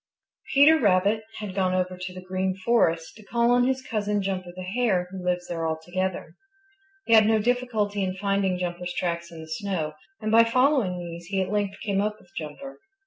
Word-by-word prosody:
Peter 305 +3 +7
Rabbit 205 0 +3
had 210 -3 -5
gone 185 -1 +1
over 185 0 -1
to 180 0 -6
the 185 0 -9
Green 185 0 -1
Forest 190 -6 +1
to 215 - -14
call 235 +3 +1
on 245 0 +4
his 260 0 -1
cousin, 210 -3 -1
Jumper 185 -2 -3
the 185 - -6
Hare, 190 -2 0
who 190 -1 -7
lives 180 0 -1
there 165 -1 -2
altogether. 175 +2 -3 0.7
He 230 - +2
had 215 -1 +7
no 220 0 +4
difficulty 220 -3 0
in 185 0 -2
finding 195 -1 0
Jumper's 180 0 -4
tracks 170 -1 -2
in 165 -1 -9
the 160 - -10
snow, 160 -2 -3 0.3
and 215 - -2
by 230 +1 +7
following 250 -5 +2
these 170 -1 -7
he 195 +1 -1
at 190 0 -1
length 205 -1 -1
came 200 -3 +1
up 210 +1 -2
with 175 - -22
Jumper. 165 - -7
190 Hz, 195 wpm, -26 LUFS, 180-215 Hz, 0.7 s, Peter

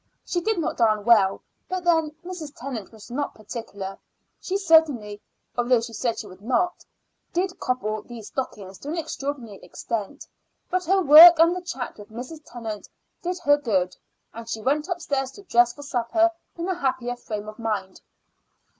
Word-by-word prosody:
She 350 - -1
did 440 +3 0
not 335 - -1
darn 215 -3 +2
well; 205 -5 +4 0.3
but 370 -1 -2
then, 325 -3 +3 0.2
Mrs. 330 -5 -7
Tennant 240 -6 -6
was 220 +1 -13
not 285 +4 -3
particular. 205 -3 -7 0.4
She 385 - -1
certainly 295 - +3 0.3
although 245 0 +3
she 230 0 -6
said 230 +1 -1
she - - -5
would 185 -1 -13
not 350 - 0 0.5
did 360 +1 -1
cobble 215 -4 -1
these 230 -2 -10
stockings 200 -7 -5
to - - -10
an 330 - -3
extraordinary 280 -9 -4
extent; 220 - -5 0.5
but 365 0 0
her 380 +3 +3
work 330 +3 +11
and 335 +2 +5
the 365 - -4
chat 265 -11 -6
with 205 - -11
Mrs. 255 +8 -8
Tennant 225 -5 -7 0.3
did 360 -1 -2
her 290 -2 +5
good, 190 -10 0 0.4
and 230 0 -9
she 225 - -3
went 295 +5 +1
upstairs 290 -7 -2
to 405 - -13
dress 240 -9 +4
for 290 +4 -11
supper 280 +5 +2 0.3
in 340 +1 -3
a 375 - +1
happier 255 -7 -1
frame 210 -3 -6
of 215 +2 -9
mind. 205 -4 -3
255 Hz, 170 wpm, -25 LUFS, 220-330 Hz, 0.5 s, work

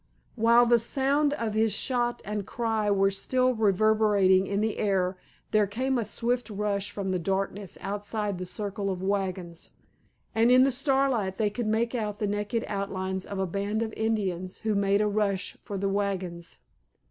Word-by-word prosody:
While 235 +1 +5
the 240 0 +4
sound 280 +5 +1
of 230 -7 -2
his 220 0 +2
shot 240 +3 0
and 210 -1 -4
cry 225 -3 -1
were 195 -1 +3
still 255 +6 +1
reverberating 210 -3 +3
in 200 0 -1
the 220 0 -1
air 190 -3 +1 0.4
there 210 -1 +3
came 255 +5 -1
a 225 - -1
swift 235 +2 -1
rush 205 -1 -2
from 200 -2 -3
the 185 - 0
darkness 195 +1 -2
outside 205 0 -3
the 185 - -5
circle 200 +1 -3
of 185 -1 -3
wagons, 190 -4 -3 0.6
and 225 +2 +3
in 255 +1 +7
the 270 - +3
starlight 265 -7 +1
they 210 -2 +1
could 235 +1 -3
make 230 +2 0
out 210 -4 -2
the 210 - -1
naked 205 +3 -2
outlines 190 -1 -3
of 200 - -5
a 190 - 0
band 200 +4 -2
of 220 -1 -5
Indians 190 -5 -2
who 215 - +2
made 200 0 +2
a 210 - +2
rush 200 -2 -1
for 200 - -5
the 195 +1 -1
wagons. 190 -4 -3
205 Hz, 175 wpm, -27 LUFS, 195-225 Hz, 0.6 s, in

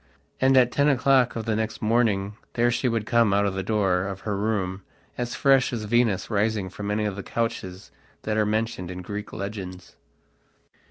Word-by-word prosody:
And 130 0 +4
at 125 -1 +5
ten 145 +1 +3
o'clock 130 -2 +3
of 115 - -4
the 110 -2 0
next 110 +1 -2
morning 110 -3 +1 0.2
there 120 0 +2
she 125 - 0
would 115 -2 -1
come 115 -4 +3
out 100 0 +2
the 95 - -2
door 95 -2 +1
of 95 -1 -6
her 105 -2 -2
room 100 -2 -1 0.3
as 120 -1 -3
fresh 135 -2 +3
as 115 -3 -3
Venus 105 -3 +1
rising 105 -2 0
from 105 0 -5
any 105 +1 0
of 105 -2 -2
the 100 - -5
couches 95 - -4 0.3
that 110 - -1
are 110 - +3
mentioned 105 -3 -2
in 90 0 -6
Greek 105 +3 -6
legends. 95 -2 -7
105 Hz, 185 wpm, -25 LUFS, 100-115 Hz, 0.3 s, at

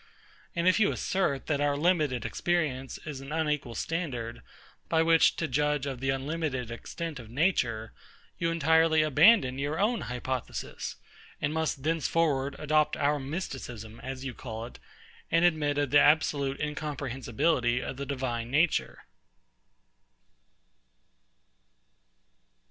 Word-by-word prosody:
And 170 +1 +1
if 185 - +5
you 210 - +4
assert, 150 -8 -1
that 145 -2 0
our 145 -1 +1
limited 150 -7 +1
experience 150 -7 -1
is 145 -4 -6
an 135 +1 -9
unequal 150 -6 -1
standard, 125 -9 -3 0.5
by 160 -1 +3
which 165 0 +5
to 165 - -2
judge 150 +1 0
of 135 -3 -4
the 135 +1 -2
unlimited 135 -3 -2
extent 155 +5 -6
of 115 -3 -11
nature; 120 - 0 0.5
you 170 - +1
entirely 160 0 +4
abandon 155 - +5
your 145 +3 -2
own 220 +3 +1
hypothesis, 125 0 -4 0.4
and 150 - -1
must 160 -4 -1
thenceforward 155 -3 +1
adopt 150 0 +2
our 145 +1 +1
Mysticism, 130 - -6
as 130 0 -6
you 130 - -4
call 115 -1 -6
it, 120 - -12 0.5
and 165 +1 +4
admit 150 -4 +2
of 145 -3 0
the 145 - +7
absolute 145 -2 +2
incomprehensibility 135 -3 -1
of 130 - -5
the 140 - -4
Divine 125 -4 -3
Nature. 155 +5 +1
145 Hz, 125 wpm, -29 LUFS, 130-160 Hz, 0.5 s, the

